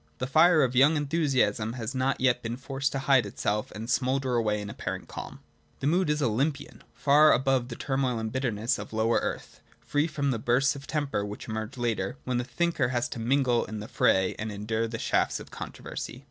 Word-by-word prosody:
The - - -2
fire 155 +4 +5
of 125 -1 0
young 145 +5 +5
enthusiasm 140 -7 +1
has 120 +1 -4
not 130 +1 0
yet 125 -1 +2
been 115 +1 -4
forced 135 +1 -2
to - - -1
hide 135 -7 +4
itself 105 +1 -2
and 110 +2 -7
smoulder 130 +2 0
away 110 -3 +1
in 105 - -5
apparent - - -5
calm. - - -8 0.4
The - - -4
mood 175 +3 +2
is 150 0 +1
Olympian 135 +5 -1
— - - -38
far 150 +2 +7
above 130 -2 +2
the 120 - -6
turmoil 135 -2 -1
and 110 -1 -3
bitterness 115 -4 -1
of 105 +1 -8
lower 110 +1 +2
earth, - - -5 0.2
free 145 +2 0
from 140 -3 -1
the 115 - -2
bursts 125 +5 +2
of 140 0 -10
temper 145 -9 -1
which 105 0 -7
emerge 110 +3 -5
later, 120 +1 -1
when 125 -1 -1
the - - -1
thinker 150 +1 0
has 120 -1 -1
to - - -6
mingle 125 0 +2
in 110 0 -6
the 105 - -7
fray 95 -4 +2
and 110 0 -3
endure 110 +2 -2
the 115 +1 -5
shafts - - 0
of - - -11
controversy. - - -7
125 Hz, 210 wpm, -28 LUFS, 110-140 Hz, 0.4 s, far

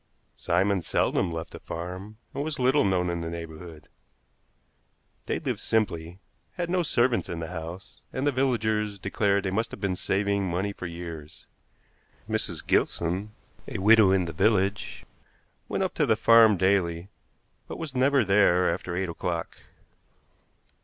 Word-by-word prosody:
Simon 100 -1 +1
seldom 85 +1 0
left 80 0 -5
the - - -9
farm, 90 +5 -7 0.2
and 140 - -2
was 155 0 -3
little 130 +3 +3
known 90 -3 +1
in 85 -1 -3
the 85 - -4
neighborhood. 85 -1 -9 1.4
They - - 0
lived - - -3
simply, 90 -6 -1 0.4
had 175 -1 -3
no 180 0 +2
servants 125 -6 +1
in 85 - -4
the 80 0 -5
house, 85 +2 -8
and 130 - -2
the 145 - +3
villagers 110 -6 0
declared 100 +1 0
they 95 - -2
must 110 +4 -1
have - - -9
been 95 -2 -1
saving 100 +1 0
money 95 +4 -1
for 90 - -6
years. 85 -3 -9 0.8
Mrs. - - 0
Gilson, 90 +5 0 0.4
a - - -4
widow 105 +1 +6
in 95 -1 +2
the 85 - -5
village, 100 +3 0 0.6
went - - 0
up - - -2
to - - +1
the 110 - +4
farm 115 -1 +6
daily, 95 -2 +1 0.6
but - - -6
was 160 -4 -6
never 130 -1 +3
there 90 -3 +4
after 85 0 -5
eight 95 +1 -1
o'clock. 85 0 -4
95 Hz, 155 wpm, -27 LUFS, 85-110 Hz, 1.4 s, widow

